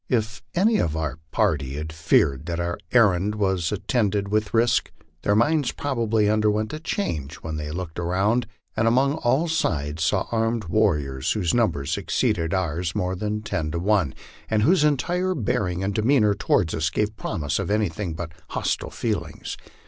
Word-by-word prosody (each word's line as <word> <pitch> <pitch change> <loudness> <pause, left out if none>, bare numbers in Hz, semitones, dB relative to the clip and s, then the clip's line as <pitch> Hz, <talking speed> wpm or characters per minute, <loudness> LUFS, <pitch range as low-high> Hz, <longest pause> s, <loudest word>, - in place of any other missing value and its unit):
If 110 -3 0
any 215 +5 +4
of 80 -1 0
our 80 -2 -3
party 75 -12 0
had 80 +2 -5
feared 80 -2 +2
that 85 0 -2
our 85 0 -2
errand 105 -4 +4
was 95 -5 0
attended 105 -1 0
with 105 0 0
risk, 115 +1 +2 0.3
their 100 - +2
minds 145 +5 +2
probably 115 -6 0
underwent 105 +2 +1
a 155 - -4
change 80 - -3
when 80 -1 -4
they 75 -1 -4
looked 85 +1 -5
around, 100 +7 +1 0.3
and 110 +1 +2
upon 130 +4 +3
all 140 +3 +1
sides 80 - -1
saw 85 - +1
armed 115 0 0
warriors, 75 -9 +1
whose 95 -6 0
numbers 80 - +1
exceeded 100 -4 0
ours 90 -2 -1
more 90 +1 -1
than 105 +3 -3
ten 80 -8 -2
to 80 - -3
one, 90 -6 +1 0.3
and 110 -1 +2
whose 170 - +4
entire 175 +6 +1
bearing 95 - -1
and 100 +1 -1
demeanor 110 -1 +3
toward 90 -4 +1
us 80 0 0
gave 105 +5 -1
promise 75 -7 -2
of - - -2
any 105 -2 +2 0.2
but 80 0 -5 0.2
hostile - - -1
feelings. - - -3
105 Hz, 165 wpm, -24 LUFS, 80-115 Hz, 0.3 s, any